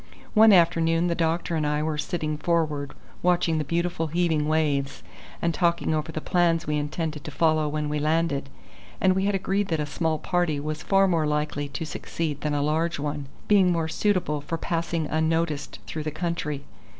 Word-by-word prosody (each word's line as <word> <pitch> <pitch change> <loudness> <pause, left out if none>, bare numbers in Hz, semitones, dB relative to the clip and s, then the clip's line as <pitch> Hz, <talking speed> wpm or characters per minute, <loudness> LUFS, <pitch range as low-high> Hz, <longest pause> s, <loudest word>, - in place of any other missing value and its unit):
One 220 0 +7
afternoon 165 -1 +4
the - - +2
doctor 165 +1 0
and 155 - 0
I 150 0 0
were 155 -1 -2
sitting 155 -2 -2
forward 150 -3 -1 0.3
watching 175 -2 +2
the - - 0
beautiful 170 +1 -1
heaving 160 -2 +1
waves, 145 -3 0 0.4
and 170 0 +2
talking 170 -2 +1
over 155 +1 -2
the 155 - -3
plans 170 0 +1
we 150 - -1
intended 150 0 -3
to - - -6
follow 155 0 +2
when 150 0 -2
we 150 0 -1
landed, 155 -2 0 0.5
and 190 -1 +4
we 190 +1 0
had 205 0 +1
agreed 195 +1 0
that 160 -3 -1
a 150 - 0
small 160 +1 -1
party 175 -3 0
was 155 +1 -4
far 195 +1 +3
more 165 -4 +1
likely 150 -1 -1
to 150 +3 -5
succeed 155 -1 -4
than 150 -1 -1
a 145 - +1
large 160 +3 0
one, 145 -1 -3 0.2
being 195 -3 +5
more 165 -2 0
suitable 165 -4 0
for 165 +3 -3
passing 165 -1 -2
unnoticed 160 -1 -1
through 155 - -5
the 155 - -2
country. 155 -3 -3
160 Hz, 185 wpm, -25 LUFS, 150-170 Hz, 0.5 s, One